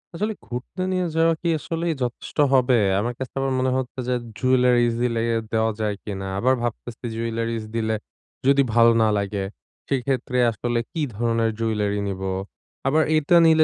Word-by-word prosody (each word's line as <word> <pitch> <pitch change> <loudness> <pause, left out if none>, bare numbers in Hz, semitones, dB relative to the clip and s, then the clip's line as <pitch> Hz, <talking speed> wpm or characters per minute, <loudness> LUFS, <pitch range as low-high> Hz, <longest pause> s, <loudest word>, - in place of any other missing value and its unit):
আসলে 210 +5 -1
ঘুরতে 125 +10 -6
নিয়ে 185 -1 +1
যাওয়া 165 0 +4
কী 170 - 0
আসলেই 165 +1 -2
যথেষ্ট 120 +5 -5 0.2
হবে? 130 -1 +4 0.2
আমার 120 +3 -1
কাছে 130 -2 -5
আবার 135 0 0
মনে 130 0 +1
হচ্ছে 130 0 -4
যে 125 - +1 0.3
jewellerys 125 -1 +3
দিলে 115 -2 +1
অ্যা 115 - +2 0.2
দেওয়া 110 0 +2
যায় 105 -1 0
কিনা? 95 -2 -5
আবার 130 +5 +3
ভাবতেছি 120 0 -5
jewellerys 115 0 -2
দিলে 110 -1 0 0.5
যদি 140 0 +6
ভাল 115 0 +6
না 110 - +4
লাগে, 100 0 -2 0.5
সেক্ষেত্রে 130 -1 -1
আসলে 120 +1 -1
কী 165 - -3
ধরনের 115 0 +1
jewellery 105 -2 0
নিব? 95 -1 -4 0.7
আবার 155 +3 +4
এইটা 155 +3 +3
নিলে 160 -1 +6
120 Hz, 165 wpm, -23 LUFS, 115-135 Hz, 0.7 s, যদি